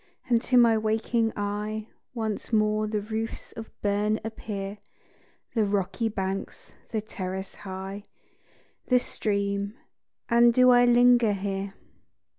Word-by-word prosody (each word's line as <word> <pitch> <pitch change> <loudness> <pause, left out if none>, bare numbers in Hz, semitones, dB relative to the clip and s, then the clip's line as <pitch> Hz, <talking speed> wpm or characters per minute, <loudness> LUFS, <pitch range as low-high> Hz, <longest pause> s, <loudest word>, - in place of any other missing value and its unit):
and 235 -2 +3
to 250 0 +2
my 235 -2 +6
waking 225 +1 +1
eye 210 +1 -3 0.3
Once 220 -2 -3
more 215 -1 +2
the 210 -1 -1
roofs 220 +2 -5
of 225 -1 -8
Berne 210 +1 +1
appear; 205 -2 -5 0.7
The 225 - +2
rocky 205 +3 0
banks, 195 -2 -4 0.2
the 220 - -1
terrace 190 -2 -5
high, 195 +1 -7 0.8
The 250 - +5
stream 200 -3 -2 0.5
and 235 0 +5
do 255 0 +7
I 245 0 +6
linger 240 -2 +5
here? 195 0 -3
215 Hz, 120 wpm, -27 LUFS, 200-230 Hz, 0.8 s, do